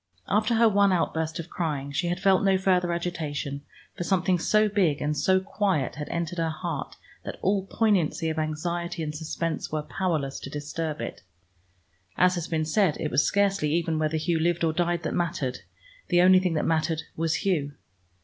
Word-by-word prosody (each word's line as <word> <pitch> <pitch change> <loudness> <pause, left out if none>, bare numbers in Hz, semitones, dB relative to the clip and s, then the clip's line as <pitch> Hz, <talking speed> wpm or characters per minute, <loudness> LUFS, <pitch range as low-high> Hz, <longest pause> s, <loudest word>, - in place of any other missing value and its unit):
After 215 +3 +2
her 230 +1 +5
one 200 -2 +4
outburst 160 -2 0
of 170 0 -7
crying, 145 -5 -2
she 175 +5 -1
had 175 +1 -1
felt 190 -1 +3
no 195 -1 +4
further 180 -2 +2
agitation, 155 -5 -3 0.3
for - - -3
something 185 0 +1
so 215 +5 +3
big 185 -8 +1
and 150 +1 -1
so 190 +6 +3
quiet 190 -7 -1
had 150 0 -6
entered 170 +1 -3
her 165 -1 +1
heart 160 -2 -4 0.3
that - - -6
all 195 0 +1
poignancy 190 -7 +1
of 160 0 -1
anxiety 170 +2 -2
and 150 -1 -3
suspense 160 +1 -3
were 155 -1 -2
powerless 155 -7 -2
to - - -8
disturb 150 0 -4
it. 115 - -6 1.0
As 180 0 +4
has 175 -2 -3
been 155 -1 -1
said, 175 0 +2
it 150 - -2
was - - +3
scarcely 195 -6 +1
even 165 -1 0
whether 155 0 0
Hugh 165 +1 0
lived 170 +1 +1
or 160 -1 +2
died 175 0 0
that - - -2
mattered: 150 -7 -1 0.5
the 175 0 +4
only 185 0 +7
thing 180 -3 0
that 155 - 0
mattered 160 0 0
was 165 0 0
Hugh. 150 -7 0
170 Hz, 190 wpm, -26 LUFS, 155-185 Hz, 1.0 s, only